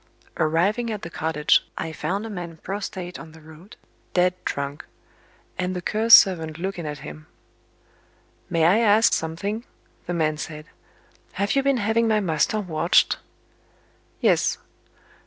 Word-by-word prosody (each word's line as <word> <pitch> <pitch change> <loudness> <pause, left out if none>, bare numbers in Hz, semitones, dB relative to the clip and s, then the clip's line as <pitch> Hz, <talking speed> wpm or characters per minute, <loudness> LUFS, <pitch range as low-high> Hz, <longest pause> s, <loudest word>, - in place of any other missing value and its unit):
Arriving 190 +10 +1
at 210 -2 -5
the 165 - -7
cottage, 155 -2 +2
I 160 - -4
found 200 +6 -3
a - - -6
man 175 -4 -7
prostate 185 -1 -6
on 160 -1 -11
the 160 - -14
road, 160 +8 -15 0.4
dead 180 0 +3
drunk 140 0 -4 0.8
and 180 0 -1
the 180 - -3
Cur's 220 +4 +7
servant 160 -5 +3
looking 175 -2 -4
at 150 0 -5
him. 75 0 -10 1.2
"May 165 -1 +2
I 185 +7 +5
ask 220 0 +4
something?" 195 +8 -2 0.4
the 175 - -2
man 155 -2 0
said. 155 0 -7 0.7
"Have 200 +5 -1
you 275 - +4
been 275 -1 +2
having 225 +1 +1
my 215 -1 +3
master 180 +3 0
watched?" 170 -3 +2 1.0
"Yes." - - +2
180 Hz, 140 wpm, -23 LUFS, 160-210 Hz, 1.2 s, Cur's